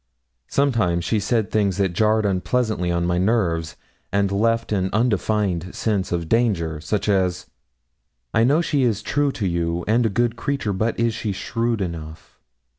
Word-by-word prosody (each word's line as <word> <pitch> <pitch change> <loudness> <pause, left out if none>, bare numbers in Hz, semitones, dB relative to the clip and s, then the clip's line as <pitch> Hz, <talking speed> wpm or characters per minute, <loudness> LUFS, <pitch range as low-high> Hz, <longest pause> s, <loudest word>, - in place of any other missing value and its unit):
Sometimes 105 -12 +1
she 110 - +1
said 110 +1 0
things 100 -3 +1
that 95 -3 +1
jarred 110 +3 +2
unpleasantly 100 0 0
on 85 0 0
my 90 0 +1
nerves, 90 -6 0 0.4
and 100 0 +1
left 115 +3 +1
an 95 -2 +1
undefined 105 -5 0
sense 105 -4 -1
of 85 -2 -2
danger. 85 -9 +1
Such 105 +6 -2
as: 95 -2 +1 0.9
'I 115 - +4
know 145 +6 +3
she's 125 - 0
true 145 -1 +1
to 105 - -3
you, 85 0 -1
and 115 +3 +3
a 110 - +2
good 120 +3 0
creature; 135 -6 -2
but 110 +5 -1
is 115 -1 +2
she 105 -1 -3
shrewd 115 +3 -2
enough?' 80 -3 -7
105 Hz, 160 wpm, -22 LUFS, 90-115 Hz, 0.9 s, I